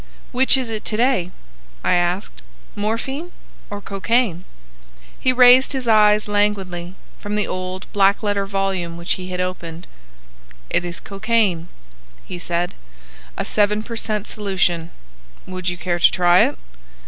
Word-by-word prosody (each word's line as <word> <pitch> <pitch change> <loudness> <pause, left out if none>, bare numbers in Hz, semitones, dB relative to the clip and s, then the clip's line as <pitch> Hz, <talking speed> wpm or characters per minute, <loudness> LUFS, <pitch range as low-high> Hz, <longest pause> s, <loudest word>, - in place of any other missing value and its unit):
"Which 260 +2 +4
is 260 -2 -2
it 220 -1 -4
to 215 - -2
day?" 240 -7 +2 0.5
I - - +2
asked,—"morphine 185 - -3 0.4
or 205 0 -6
cocaine?" 200 -2 0 0.7
He 255 - +3
raised 255 +2 +6
his 260 -3 -3
eyes 210 -1 +5
languidly 195 -4 -1 0.2
from 205 0 -4
the 210 - +1
old 185 0 -5
black 200 +1 +3
letter 205 -1 0
volume 195 -4 -2
which 170 +1 -1
he 185 -1 -6
had 180 0 -4
opened. 175 -2 -4 0.9
"It - - +2
is 175 0 -5
cocaine," 200 -5 0 0.6
he 180 - -7
said,—"a - - -6
seven 210 0 +1
per 230 0 -7
cent. 215 -2 -2
solution. 185 -6 -1 0.6
Would 185 -1 -3
you 175 - -4
care 175 0 -2
to - - +6
try 175 0 +5
it?" - - -6
195 Hz, 135 wpm, -21 LUFS, 175-215 Hz, 0.9 s, raised